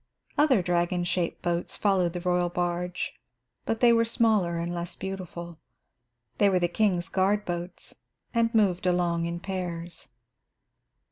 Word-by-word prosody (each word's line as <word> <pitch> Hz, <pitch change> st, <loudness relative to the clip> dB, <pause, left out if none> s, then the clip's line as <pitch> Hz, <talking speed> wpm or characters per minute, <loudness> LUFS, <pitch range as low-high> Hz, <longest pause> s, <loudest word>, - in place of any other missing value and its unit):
Other 265 Hz, -10 st, +4 dB
dragon 175 Hz, 0 st, +1 dB
shaped 175 Hz, -1 st, -1 dB
boats 175 Hz, 0 st, -1 dB
followed 185 Hz, -4 st, +2 dB
the 175 Hz, -, -3 dB
royal 180 Hz, -1 st, +1 dB
barge, 175 Hz, +1 st, -2 dB, 0.5 s
but 225 Hz, 0 st, -1 dB
they 240 Hz, -1 st, +7 dB
were 230 Hz, 0 st, +4 dB
smaller 220 Hz, -7 st, +2 dB
and 170 Hz, +1 st, -2 dB
less 175 Hz, 0 st, -4 dB
beautiful. 175 Hz, -3 st, -6 dB, 0.8 s
They 200 Hz, -, +5 dB
were 190 Hz, -, +3 dB
the 175 Hz, -1 st, +2 dB
king's 180 Hz, -2 st, +1 dB
guard 195 Hz, +4 st, +1 dB
boats, 175 Hz, 0 st, -5 dB, 0.4 s
and 230 Hz, -1 st, +2 dB
moved 185 Hz, -4 st, +3 dB
along 170 Hz, -2 st, +1 dB
in 170 Hz, 0 st, -4 dB
pairs. 175 Hz, -3 st, -5 dB
180 Hz, 140 wpm, -27 LUFS, 175-195 Hz, 0.8 s, they